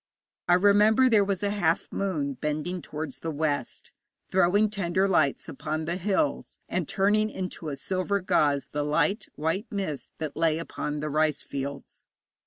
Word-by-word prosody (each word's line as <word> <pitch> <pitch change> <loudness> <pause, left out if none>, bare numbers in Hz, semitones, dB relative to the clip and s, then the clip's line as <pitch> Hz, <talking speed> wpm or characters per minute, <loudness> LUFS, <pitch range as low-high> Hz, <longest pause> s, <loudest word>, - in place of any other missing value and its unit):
I 175 - +6
remember 210 +6 +5
there 220 -4 +5
was 195 -1 -2
a 200 - +1
half 175 -4 +1
moon 155 -8 -1
bending 150 +6 -3
towards 150 -4 -5
the 165 - -4
west, 145 -4 -2 0.4
throwing 190 +3 +4
tender 190 -2 0
lights 155 -7 +2
upon 155 +2 -4
the 170 +2 -1
hills, 205 - -1
and - - -2
turning 210 +2 +2
into 180 -5 -5
a 140 - -3
silver 190 +6 -1
gauze 150 -7 +2
the 150 - -1
light 150 +8 +1
white 165 +9 -1
mist 190 - -4
that 155 -2 -4
lay 160 0 +2
upon 150 -2 -4
the 150 - -2
rice 155 0 +1
fields. 140 0 -6
170 Hz, 160 wpm, -27 LUFS, 150-200 Hz, 0.4 s, I